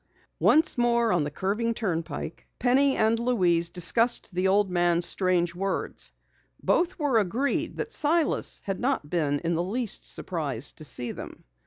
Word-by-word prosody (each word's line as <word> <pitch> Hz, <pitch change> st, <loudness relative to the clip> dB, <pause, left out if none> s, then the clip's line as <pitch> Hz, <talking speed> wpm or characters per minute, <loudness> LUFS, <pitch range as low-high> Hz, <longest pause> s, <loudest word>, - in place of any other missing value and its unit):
Once 310 Hz, -4 st, +3 dB
more 235 Hz, -1 st, +2 dB
on 175 Hz, -4 st, +2 dB
the -, -, -3 dB
curving 210 Hz, +9 st, -2 dB
turnpike, 170 Hz, -8 st, -4 dB
Penny 265 Hz, +2 st, +3 dB
and 220 Hz, +1 st, +2 dB
Louise 180 Hz, -9 st, +2 dB
discussed 200 Hz, +5 st, +2 dB
the 185 Hz, +2 st, +1 dB
old 200 Hz, +1 st, +3 dB
man's 175 Hz, -1 st, +2 dB
strange 180 Hz, -2 st, +1 dB
words. 185 Hz, -, -2 dB, 0.5 s
Both 350 Hz, +1 st, +1 dB
were 285 Hz, -8 st, +2 dB
agreed 230 Hz, +8 st, -1 dB
that 450 Hz, -, -4 dB
Silas 315 Hz, -2 st, +1 dB
had 195 Hz, -1 st, -3 dB
not 250 Hz, -, -1 dB
been 150 Hz, -5 st, +1 dB
in 170 Hz, 0 st, -1 dB
the 165 Hz, -, 0 dB
least 215 Hz, +4 st, -1 dB
surprised 145 Hz, -7 st, -3 dB
to 155 Hz, -, -6 dB
see 120 Hz, -4 st, -2 dB
them. -, -, -10 dB
195 Hz, 155 wpm, -26 LUFS, 170-240 Hz, 0.5 s, Once